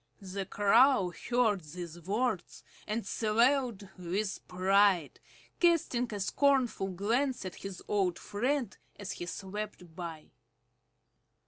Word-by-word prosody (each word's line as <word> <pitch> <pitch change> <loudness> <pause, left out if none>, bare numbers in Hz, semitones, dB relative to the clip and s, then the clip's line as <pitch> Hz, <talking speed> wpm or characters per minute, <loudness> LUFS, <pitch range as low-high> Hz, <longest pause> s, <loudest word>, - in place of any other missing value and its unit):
The 195 -1 -5
Crow 205 -2 +4 0.2
heard 235 -5 +3
these 170 +2 -8
words 205 +1 -2 0.2
and 215 +2 -2
swelled 230 -1 +1
with 190 +3 -2
pride, 185 -2 +3 0.4
casting 300 -9 +2
a 205 - -4
scornful 255 0 +2
glance 230 +7 0
at 185 - -6
his 195 -2 -7
old 190 -4 +1
friend 245 +2 -1 0.2
as 205 0 -5
he 175 - -6
swept 190 -3 -6
by. 165 -3 -7
205 Hz, 110 wpm, -31 LUFS, 185-240 Hz, 0.4 s, Crow